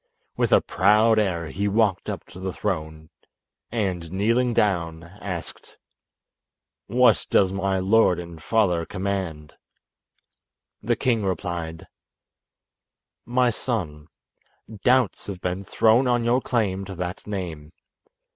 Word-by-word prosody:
With - - 0
a - - +6
proud 105 +4 +3
air 85 -6 -1
he 100 +5 -2
walked 100 -2 +1
up - - -5
to 90 - -11
the 95 0 -3
throne, 80 -5 -4 0.6
and 95 -8 -2
kneeling 115 +6 +1
down, 85 -7 0
asked: 90 -1 -8 1.1
"What 125 -2 +3
does 95 -1 +3
my 95 0 0
lord 95 -1 +3
and 85 -2 -8
father 90 -5 +1
command?" 95 -5 -4 1.3
The - - +1
king 115 -4 0
replied: 85 -3 -3 1.4
"My 125 0 +2
son, 85 - -4 0.8
doubts 130 +1 +2
have 100 -3 -5
been 90 +2 -3
thrown 115 +6 +3
on 120 -1 +2
your 120 +2 +2
claim 100 -7 -1
to 95 0 -8
that 90 +2 -5
name. 85 -7 -5
95 Hz, 120 wpm, -24 LUFS, 85-110 Hz, 1.4 s, a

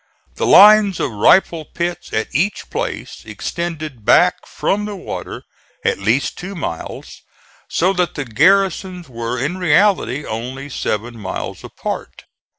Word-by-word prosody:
The - - -2
lines 210 -2 +7
of 130 - -1
rifle 160 - +3
pits 175 +2 -4
at 110 0 -2
each 185 +10 -1
place - - -4
extended 155 -8 -5
back - - +3
from 210 +1 -1
the 210 -1 -5
water 190 - -7 0.4
at - - +1
least 110 +7 0
two 195 +3 -7
miles, 85 - -6 0.5
so 185 +3 +2
that 180 -2 -1
the 145 - -3
garrisons 180 - +2
were 120 -1 -4
in 150 +9 -2
reality 175 - +2
only 130 +5 -5
seven 115 -2 -3
miles 95 -2 -5
apart. - - -6
160 Hz, 135 wpm, -18 LUFS, 120-185 Hz, 0.5 s, lines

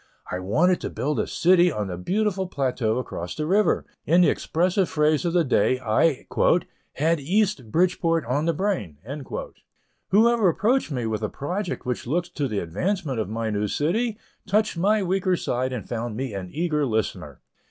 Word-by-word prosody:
I 90 - -2
wanted 155 - +2
to - - -3
build 150 +3 -2
a - - 0
city 180 0 +4
on 105 -7 -2
the 90 -2 -4
beautiful 190 - -1
plateau 125 -8 -1
across 90 -8 -5
the 155 - -2
river; 200 +6 +2 0.2
in 170 +3 +4
the 175 - +5
expressive 180 +3 0
phrase 150 +2 +2
of 170 - 0
the 175 -1 +4
day, 130 -2 +2
I 130 +5 +1 0.7
"had 160 +3 +1
East 185 - 0
Bridgeport 165 -2 +2
on 140 +6 0
the 165 - +2
brain." 165 - -2 1.1
Whoever 225 0 +4
approached 220 +9 +1
me 125 -5 -2
with 110 -1 -2
a 110 - -1
project 180 +6 -4
which 125 -1 -3
looked 175 +6 -1
to 145 -3 0
the 110 -4 -3
advancement 135 - -2
of 105 - -2
my 110 0 -2
new 105 0 0
city, 210 - 0 0.3
touched 210 +1 +1
my 205 +5 +2
weak 190 +1 -1
side 130 -2 -1
and 125 -4 -5
found 115 -2 -4
me 130 -3 -3
an 95 -2 -5
eager 155 -2 0
listener. 110 -2 -3
155 Hz, 175 wpm, -24 LUFS, 120-185 Hz, 1.1 s, the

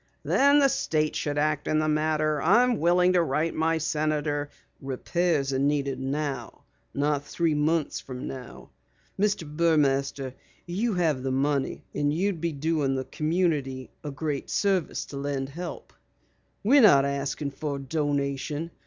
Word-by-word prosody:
"Then 280 +1 +4
the 280 -1 +6
State 160 - 0
should 145 -1 -2
act 150 0 0
in 155 - +2
the 155 0 +1
matter. 155 -1 +1
I'm 240 +6 +4
willing 180 +2 +4
to 180 - +4
write 160 +1 0
my 160 +1 +1
senator 150 -2 -1 0.2
" - - -39
"Repairs 150 0 0
are 130 - 0
needed 140 -1 0
now, 135 -2 -4 0.3
not 145 0 0
three 165 +1 0
months 150 +1 0
later. 125 -1 -7 0.5
Mr. 195 -7 0
Burmaster, 140 -5 +1 0.3
you 200 +5 -1
have 160 -7 +1
the 135 0 -2
money 140 +1 0
and 145 0 +1
you'd 175 +1 -1
be 170 -1 0
doing 145 -2 0
the 130 0 -3
community 150 -6 -1
a 150 - -4
great 145 0 -3
service 195 -4 0
to 140 - -8
lend 140 -1 -3
help. 175 +5 -7 0.7
We're 270 +7 +6
not 140 - +7
asking 140 +1 -2
for 145 +1 -4
a - - -5
donation. 145 +2 -2
150 Hz, 150 wpm, -26 LUFS, 140-165 Hz, 0.7 s, not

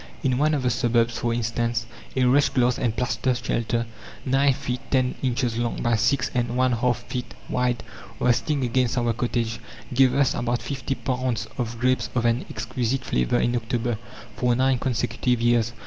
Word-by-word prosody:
In 130 -1 +1
one 155 +1 +3
of 140 - -2
the 125 - +2
suburbs, 120 0 +1
for 120 - 0
instance, 115 0 -1 0.3
a 130 - +2
wretched 135 +2 +3
glass 125 -1 +3
and 115 -3 0
plaster 125 0 0
shelter, 115 -1 -1 0.4
nine 135 +2 +4
feet 125 -1 -3
ten 130 -2 +2
inches 120 -2 0
long 120 -1 -1
by 120 -1 +3
six 120 +5 +1
and 120 -1 -1
one 130 0 +3
half 120 0 0
feet 125 0 -5
wide, 125 -1 0 0.4
resting 125 +4 +1
against 125 +1 +1
our 120 -1 +1
cottage, 115 -1 -1 0.3
gave 130 0 +4
us 140 -2 +3
about 120 0 -1
fifty 135 -1 -3
pounds 125 -3 -2
of 120 -1 -2
grapes 125 -1 +1
of 120 -1 +1
an 120 +2 +1
exquisite 125 +3 -2
flavour 60 -1 +1
in 120 +1 +1
October, 120 -1 -1 0.4
for 125 -1 +2
nine 130 0 +2
consecutive 120 -1 0
years. 120 -1 +2
120 Hz, 175 wpm, -24 LUFS, 120-130 Hz, 0.4 s, nine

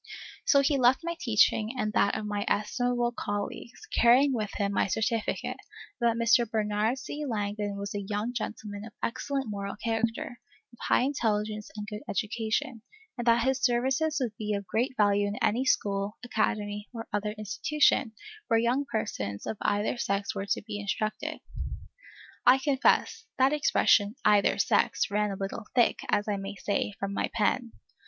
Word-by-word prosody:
So 280 - +5
he 275 0 +2
left 255 +3 +4
my 340 0 -2
teaching 220 0 +2
and 215 -3 -1
that 200 - +2
of 215 - -4
my 205 -1 -2
estimable 240 +3 0
colleagues, 205 - -5
carrying 255 +4 +5
with 215 -4 -1
him 200 0 -1
my - - +2
certificate, 220 +2 -1 0.4
that 235 -2 +2
Mr. 230 0 +3
Bernard 215 +2 0
C. 290 +2 -6
Langdon 205 -4 -2
was 200 0 -5
a 205 - -2
young 210 +4 -3
gentleman 210 -3 -5
of 225 - -10
excellent 270 +2 -2
moral 200 -1 -4
character, 225 +2 -2 0.3
of 235 - -18
high - - +4
intelligence 215 -5 -1
and 210 - -4
good 210 +1 -7
education, 225 +5 -2 0.3
and 240 -1 -5
that 235 0 +5
his 265 0 +1
services 265 +5 +1
would 240 -5 -2
be 210 -1 -2
of 200 0 -4
great 245 +6 -1
value 205 -1 +3
in 205 - -3
any 240 +5 +1
school, 200 -3 0
academy, 210 -3 -1
or 230 -2 -7
other 210 0 -1
institution, 240 +3 +1 0.3
where 230 - +3
young 245 +5 +1
persons 105 - -3
of - - -3
either 205 +4 0
sex 200 -2 -1
were 195 0 -4
to - - -1
be 210 -1 -5
instructed. 215 +1 -3 1.0
I 250 +2 +7
confess, 270 0 +2
that 265 +2 +4
expression, 220 -7 +3
"either 210 -1 +4
sex," - - +2
ran 210 0 +1
a 195 - -3
little 195 +3 -5
thick, 240 -2 +4
as 205 - +1
I 205 -1 0
may 195 +1 -6
say, 205 0 -1
from 195 0 -3
my - - -1
pen. 235 +2 +1
220 Hz, 165 wpm, -28 LUFS, 205-245 Hz, 1.0 s, I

